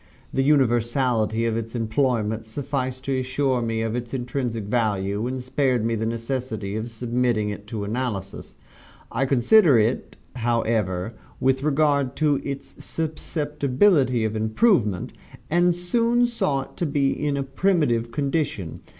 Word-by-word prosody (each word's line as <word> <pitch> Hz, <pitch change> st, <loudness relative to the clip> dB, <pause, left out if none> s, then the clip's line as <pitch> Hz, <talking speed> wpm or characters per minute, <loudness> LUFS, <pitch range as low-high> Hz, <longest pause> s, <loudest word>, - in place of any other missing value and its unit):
The 135 Hz, -, +2 dB
universality 120 Hz, -4 st, +2 dB
of 115 Hz, -1 st, 0 dB
its 115 Hz, +1 st, -4 dB
employment 115 Hz, -2 st, 0 dB
sufficed 130 Hz, 0 st, -3 dB
to 135 Hz, -1 st, 0 dB
assure 130 Hz, 0 st, 0 dB
me 115 Hz, -1 st, -1 dB
of 115 Hz, 0 st, -2 dB
its 120 Hz, +1 st, -4 dB
intrinsic 120 Hz, -3 st, -3 dB
value, 105 Hz, -1 st, 0 dB
and 130 Hz, +1 st, -3 dB
spared 130 Hz, -3 st, +1 dB
me 115 Hz, -, 0 dB
the 110 Hz, 0 st, -1 dB
necessity 115 Hz, -3 st, -3 dB
of 110 Hz, +2 st, -3 dB
submitting 120 Hz, -2 st, 0 dB
it 105 Hz, 0 st, -8 dB
to 105 Hz, -1 st, -4 dB
analysis. 105 Hz, -3 st, -4 dB, 0.6 s
I 135 Hz, -, 0 dB
considered 140 Hz, -, +5 dB
it, 110 Hz, +3 st, 0 dB, 0.2 s
however, 115 Hz, -4 st, 0 dB, 0.3 s
with 130 Hz, 0 st, +2 dB
regard 145 Hz, -2 st, +2 dB
to 150 Hz, -3 st, +2 dB
its 140 Hz, -1 st, -7 dB
susceptibility 150 Hz, -, +1 dB
of 110 Hz, 0 st, -2 dB
improvement, 110 Hz, -, +1 dB, 0.4 s
and 175 Hz, +1 st, +3 dB
soon 230 Hz, +7 st, +2 dB
saw 150 Hz, -, 0 dB
it 135 Hz, -, -12 dB
to 175 Hz, -, -1 dB
be 140 Hz, -1 st, +1 dB
in 145 Hz, -1 st, -1 dB
a 140 Hz, -, 0 dB
primitive 135 Hz, -7 st, +1 dB
condition. 140 Hz, -, -2 dB
125 Hz, 140 wpm, -24 LUFS, 110-140 Hz, 0.6 s, considered